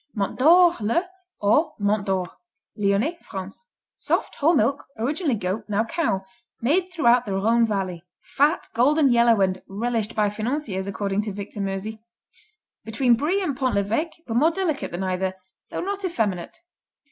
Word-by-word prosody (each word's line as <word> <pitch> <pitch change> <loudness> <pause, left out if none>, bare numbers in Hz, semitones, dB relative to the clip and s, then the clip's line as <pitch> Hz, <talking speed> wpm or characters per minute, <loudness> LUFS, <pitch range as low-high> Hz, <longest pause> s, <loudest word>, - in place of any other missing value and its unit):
Mont 200 +2 -2
d'or, 345 +5 +7
le, 230 - +1 0.4
or 300 +10 +2
Mont 205 0 0
Dore 185 -2 -2 0.4
Lyonnais, 210 +11 0
France 195 - -8 0.3
Soft; - - -1
whole 320 +4 +3
milk; 285 -1 +1
originally 285 +4 0
goat, 190 +1 -3
now 210 +1 +1
cow; 230 - -1 0.3
made 345 +10 +1
throughout 245 -8 +4
the 200 - -2
Rhone 225 +4 +3
Valley. 190 -5 -3 0.2
Fat, 295 +5 +1
golden 275 +4 +4
yellow 235 -2 +4
and 185 -1 +1
"relished 225 +2 -2
by 210 -1 +2
financiers" 215 -3 -3
according 200 0 -1
to 210 0 -4
Victor 200 +1 -6
Meusy. 200 +3 -4 0.8
Between 235 +2 +2
Brie 345 +11 0
and 295 -7 -1
Pont 255 -3 0
l'Evêque 230 - -1
but 230 -1 -2
more 305 +6 +5
delicate 335 -4 -2
than 175 +2 -4
either, 185 0 -1 0.3
though - - -4
not 400 +2 -3
effeminate. 215 - -2
225 Hz, 155 wpm, -24 LUFS, 200-295 Hz, 0.8 s, d'or